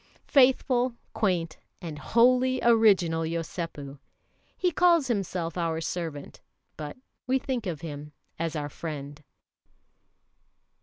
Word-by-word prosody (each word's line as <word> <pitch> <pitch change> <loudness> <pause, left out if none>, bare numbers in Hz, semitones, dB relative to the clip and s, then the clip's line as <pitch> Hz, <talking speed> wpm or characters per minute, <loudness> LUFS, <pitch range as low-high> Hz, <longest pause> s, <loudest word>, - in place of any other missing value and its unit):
Faithful, 255 -2 +3 0.2
quaint, 175 -6 -1 0.2
and 155 -4 -7
wholly 255 +6 +3
original 205 -8 +4
Yosépu! 165 -4 -4 0.6
He 360 -1 +1
calls 340 -2 +4
himself 185 -7 -2
our 165 -1 -1
servant, 160 -3 -5 0.3
but 150 +5 -7 0.3
we 260 +1 +3
think 250 -5 -3
of 165 -4 -4
him 150 -2 -7 0.3
as 165 -1 -2
our 145 -1 -2
friend. 145 -1 -7
170 Hz, 105 wpm, -27 LUFS, 155-245 Hz, 0.6 s, original